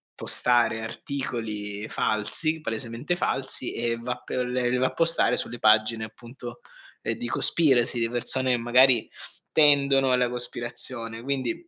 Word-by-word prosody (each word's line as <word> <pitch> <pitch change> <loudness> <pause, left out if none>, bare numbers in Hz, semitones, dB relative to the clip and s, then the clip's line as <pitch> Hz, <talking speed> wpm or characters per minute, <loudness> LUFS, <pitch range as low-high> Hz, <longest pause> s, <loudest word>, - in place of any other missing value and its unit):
postare 120 -2 +2
articoli 110 -4 -7
falsi, 155 +10 -2
palesemente 115 +6 -4
falsi, 130 -6 -3
e 115 0 -3
va 120 +1 -6
p - - -19
le 125 0 -2
le 125 - -1
va 130 +1 0
a - - -8
postare 165 0 +3
sulle 120 - -4
pagine 110 +1 +1
appunto, 120 +2 -12 0.4
ehm, - - -3
di 120 - -6
conspiracy, 125 -2 +3
di 115 0 -1
persone 125 +2 +2
e - - 0
magari 120 0 +2 0.4
tendono 140 -3 +3
alla 125 -1 0
cospirazione. 120 -1 +1
Quindi 135 - -4
120 Hz, 140 wpm, -24 LUFS, 115-130 Hz, 0.4 s, postare